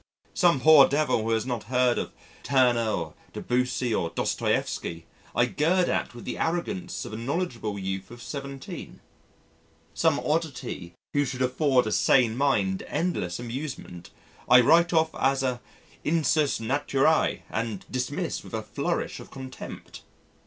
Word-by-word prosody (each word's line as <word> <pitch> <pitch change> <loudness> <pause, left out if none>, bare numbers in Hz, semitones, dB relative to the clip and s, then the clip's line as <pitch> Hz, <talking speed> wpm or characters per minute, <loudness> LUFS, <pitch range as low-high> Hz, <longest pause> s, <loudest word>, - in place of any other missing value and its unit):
Some 175 -6 +3
poor 155 -2 +8
devil 145 -5 +1
who 110 - -2
has 110 -1 +1
not 120 -4 -3
heard 125 -1 +2
of - - -4 0.3
Turner 125 -4 +3
or 85 -7 -3 0.2
Debussy 125 -1 -1
or 85 - 0
Dostoieffsky 85 0 -1 0.3
I 120 - +4
gird 175 +8 +1
at - - -1
with 120 - -10
the - - -4
arrogance 175 +2 -2
of - - -8
a - - -4
knowledgeable 120 - -3
youth 95 -1 -4
of 120 - -11
17. 140 +1 -7 0.9
Some - - +2
oddity 135 - -3 0.2
who 145 - +3
should 130 -1 -2
afford 130 0 +2
a 110 - -2
sane 120 -2 +3
mind 105 -9 +1
endless 125 - -1
amusement, 120 - -6 0.4
I 125 +1 +9
write 170 +7 +5
off 160 -1 +2
as 135 0 +1
a 125 -2 -1 0.4
Insus 155 -2 +2
naturæ 140 +5 +1
and 110 -3 -3
dismiss 125 0 -2
with - - -7
a - - -3
flourish - - -2
of - - -11
contempt. 130 -1 -9
130 Hz, 145 wpm, -26 LUFS, 115-150 Hz, 0.9 s, I